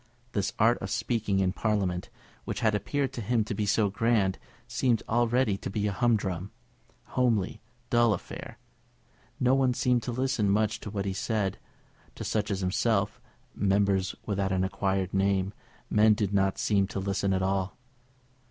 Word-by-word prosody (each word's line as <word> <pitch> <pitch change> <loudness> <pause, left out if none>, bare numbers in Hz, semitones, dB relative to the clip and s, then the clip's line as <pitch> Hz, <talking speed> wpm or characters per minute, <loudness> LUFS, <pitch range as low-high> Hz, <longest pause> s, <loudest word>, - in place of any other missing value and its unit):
This 100 -4 -1
art 115 +3 +4
of 95 - -5
speaking 110 -4 0
in 95 -1 +1
Parliament, 100 -5 -1 0.3
which - - -4
had 110 -2 +3
appeared 135 +6 -1
to 120 - -4
him 115 +1 +1
to 105 - -4
be 105 0 -1
so 105 0 +2
grand, 105 -3 +1 0.3
seemed 120 -1 +1
already 120 -2 +2
to - - -5
be 105 +2 -1
a 105 - +1
humdrum, 100 -4 0 0.6
homely, 110 -5 +1 0.3
dull 120 -1 +4
affair. - - -9 0.8
No 125 +1 +3
one 130 -2 +3
seemed 125 -1 +2
to 120 - -4
listen 125 -4 0
much 105 +1 +1
to - - -7
what 100 -1 -3
was 95 0 -2
said. 105 -4 -1 0.6
To - - -6
such 105 -1 -1
as 100 -2 -1
himself, 100 +3 0 0.3
Members 100 -1 +1
without 100 -2 -1
an 95 -1 +1
acquired 95 -1 -1
name, 95 0 +1 0.3
men 105 0 +5
did 100 -2 -1
not 95 -1 +2
seem 100 -2 +2
to 100 - -4
listen 100 0 0
at 95 0 +1
all. 95 0 -1
105 Hz, 165 wpm, -28 LUFS, 95-115 Hz, 0.8 s, men